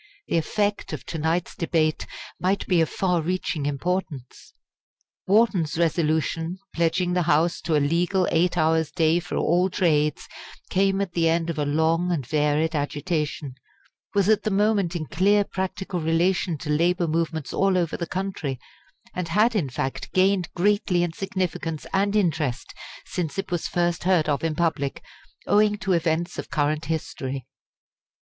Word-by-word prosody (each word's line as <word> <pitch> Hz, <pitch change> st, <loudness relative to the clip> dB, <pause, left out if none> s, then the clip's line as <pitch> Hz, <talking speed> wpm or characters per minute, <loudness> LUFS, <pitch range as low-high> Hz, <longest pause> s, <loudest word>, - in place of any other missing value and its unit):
The -, -, +1 dB
effect 205 Hz, +5 st, -1 dB
of -, -, -6 dB
to 165 Hz, -, -5 dB
night's 160 Hz, +3 st, -1 dB
debate 160 Hz, -5 st, 0 dB, 0.3 s
might 190 Hz, +2 st, 0 dB
be 175 Hz, -3 st, +3 dB
of 160 Hz, -, +1 dB
far 180 Hz, -3 st, 0 dB
reaching 165 Hz, -3 st, -2 dB
importance. 145 Hz, -3 st, -4 dB, 0.7 s
Wharton's 195 Hz, -7 st, +3 dB
Resolution, 165 Hz, +1 st, 0 dB, 0.2 s
pledging 175 Hz, +2 st, +1 dB
the 180 Hz, -, +2 dB
House 165 Hz, +3 st, +2 dB
to 160 Hz, -1 st, 0 dB
a -, -, +5 dB
Legal 175 Hz, +5 st, +1 dB
Eight 175 Hz, +2 st, +2 dB
Hours' 160 Hz, -1 st, +2 dB
Day 165 Hz, 0 st, +2 dB
for 175 Hz, -, -6 dB
all 180 Hz, +3 st, +2 dB
trades, 150 Hz, -5 st, +1 dB, 0.4 s
came 195 Hz, +1 st, +2 dB
at 195 Hz, -3 st, -2 dB
the 165 Hz, -1 st, +2 dB
end 165 Hz, 0 st, +1 dB
of 155 Hz, -, -5 dB
a 145 Hz, -, +1 dB
long 160 Hz, +4 st, +1 dB
and 150 Hz, -7 st, -1 dB
varied 150 Hz, +3 st, +1 dB
agitation, 150 Hz, -1 st, -2 dB, 0.6 s
was 200 Hz, -1 st, +3 dB
at 220 Hz, -1 st, +4 dB
the -, -, -1 dB
moment 200 Hz, -3 st, +1 dB
in 160 Hz, -2 st, -2 dB
clear 200 Hz, +7 st, +3 dB
practical 190 Hz, -1 st, -4 dB
relation 170 Hz, +1 st, +1 dB
to 150 Hz, -, -4 dB
labour 170 Hz, +3 st, +2 dB
movements 160 Hz, -4 st, -2 dB
all 195 Hz, -1 st, +2 dB
over 170 Hz, -3 st, 0 dB
the 170 Hz, -, -4 dB
country, 180 Hz, -9 st, -3 dB, 0.5 s
and 180 Hz, -2 st, -3 dB
had 210 Hz, +8 st, +3 dB
in 165 Hz, -10 st, 0 dB
fact 130 Hz, +1 st, -4 dB
gained 185 Hz, -1 st, +2 dB
greatly 185 Hz, -1 st, +2 dB
in 170 Hz, -2 st, -2 dB
significance 180 Hz, -4 st, -3 dB
and 200 Hz, +2 st, +1 dB
interest 155 Hz, -, 0 dB, 0.3 s
since 165 Hz, -3 st, -4 dB
it 195 Hz, -, -3 dB
was 175 Hz, -2 st, -1 dB
first 175 Hz, -1 st, -1 dB
heard 180 Hz, -5 st, +3 dB
of 145 Hz, -1 st, 0 dB
in 160 Hz, -2 st, 0 dB
public, 155 Hz, -4 st, -1 dB, 0.4 s
owing 210 Hz, 0 st, +3 dB
to 190 Hz, -1 st, 0 dB
events 170 Hz, +1 st, 0 dB
of -, -, -6 dB
current 155 Hz, 0 st, 0 dB
history. 135 Hz, -4 st, -4 dB
170 Hz, 160 wpm, -24 LUFS, 155-185 Hz, 0.7 s, a